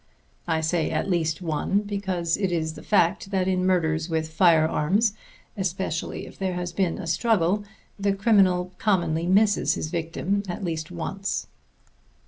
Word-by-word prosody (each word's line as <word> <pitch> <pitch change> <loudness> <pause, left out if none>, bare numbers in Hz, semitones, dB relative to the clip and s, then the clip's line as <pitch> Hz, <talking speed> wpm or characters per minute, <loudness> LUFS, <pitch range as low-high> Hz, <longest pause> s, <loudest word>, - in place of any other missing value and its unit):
(I 160 -1 +1
say 160 +1 0
at 195 - -1
least 165 0 0
one, 165 +5 0
because 190 -5 -1
it 195 -3 -1
is 160 -2 -1
the - - -10
fact 195 -2 +2
that 190 -2 0
in 185 -1 +1
murders 160 -3 +1
with 160 -1 -1
firearms, 170 +5 +3 0.4
especially 185 -4 -3
if - - -13
there 190 -2 -1
has 175 0 -4
been 180 -2 0
a - - -6
struggle, 185 +2 +1 0.4
the 200 0 +1
criminal 195 -4 +3
commonly 170 -5 +1
misses 205 +3 +3
his 155 - -4
victim 170 +4 -1
at 175 - -4
least 160 -3 -3
once.) 190 +3 -3
180 Hz, 150 wpm, -25 LUFS, 165-195 Hz, 0.4 s, firearms